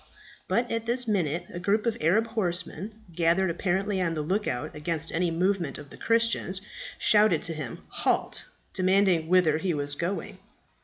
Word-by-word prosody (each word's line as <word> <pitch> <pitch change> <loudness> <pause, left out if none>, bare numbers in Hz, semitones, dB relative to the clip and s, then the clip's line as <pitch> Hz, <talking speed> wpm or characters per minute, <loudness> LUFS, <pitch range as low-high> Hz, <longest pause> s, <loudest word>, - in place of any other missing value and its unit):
But 240 +1 0
at 230 0 -2
this 245 +1 +1
minute 175 -5 0
a 175 - -4
group 205 +5 +1
of 230 -2 +1
Arab 190 +9 +3
horsemen, 205 0 -3
gathered, 170 +2 +3
apparently 190 +3 -1
on 165 -2 0
the 155 - -2
look 195 +7 -1
out 125 - -3
against 160 +1 -1
any 175 +1 +1
movement 175 -2 0
of 145 -2 -11
the - - -10
Christians, 230 -5 +1 0.4
shouted 210 -6 +4
to 165 - +1
him 150 -7 -6
"Halt!" - - 0 0.3
demanding 185 -3 +3
whither 170 -3 +4
he 175 -1 -1
was 145 0 -1
going. 170 +6 -4
180 Hz, 165 wpm, -27 LUFS, 165-205 Hz, 0.4 s, shouted